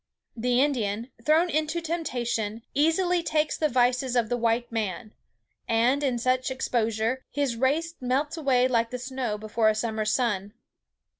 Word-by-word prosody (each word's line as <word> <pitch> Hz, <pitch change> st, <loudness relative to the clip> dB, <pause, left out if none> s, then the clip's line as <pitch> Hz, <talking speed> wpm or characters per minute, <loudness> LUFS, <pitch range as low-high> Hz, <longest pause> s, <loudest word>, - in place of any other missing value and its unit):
The 245 Hz, +1 st, +1 dB
Indian, 235 Hz, -4 st, -1 dB
thrown 315 Hz, +6 st, +4 dB
into 310 Hz, +2 st, 0 dB
temptation, 240 Hz, -10 st, -2 dB
easily 345 Hz, +4 st, +2 dB
takes 310 Hz, -2 st, 0 dB
the 310 Hz, -, +1 dB
vices 250 Hz, 0 st, +1 dB
of 235 Hz, -3 st, +2 dB
the 245 Hz, -, +1 dB
white 235 Hz, 0 st, 0 dB
man; 215 Hz, -1 st, -3 dB, 0.5 s
and, 240 Hz, +5 st, +2 dB
in 260 Hz, -4 st, +1 dB
such 255 Hz, +2 st, +1 dB
exposure, 235 Hz, -1 st, -1 dB
his 280 Hz, -4 st, -1 dB
race 295 Hz, +8 st, 0 dB
melts 265 Hz, +5 st, 0 dB
away 265 Hz, -5 st, +2 dB
like 230 Hz, -2 st, +1 dB
the 250 Hz, -, -4 dB
snow 250 Hz, -3 st, -3 dB
before 215 Hz, +1 st, +1 dB
a 215 Hz, -, +1 dB
summer's 220 Hz, -1 st, -1 dB
sun. 210 Hz, -4 st, 0 dB
250 Hz, 150 wpm, -26 LUFS, 225-285 Hz, 0.5 s, thrown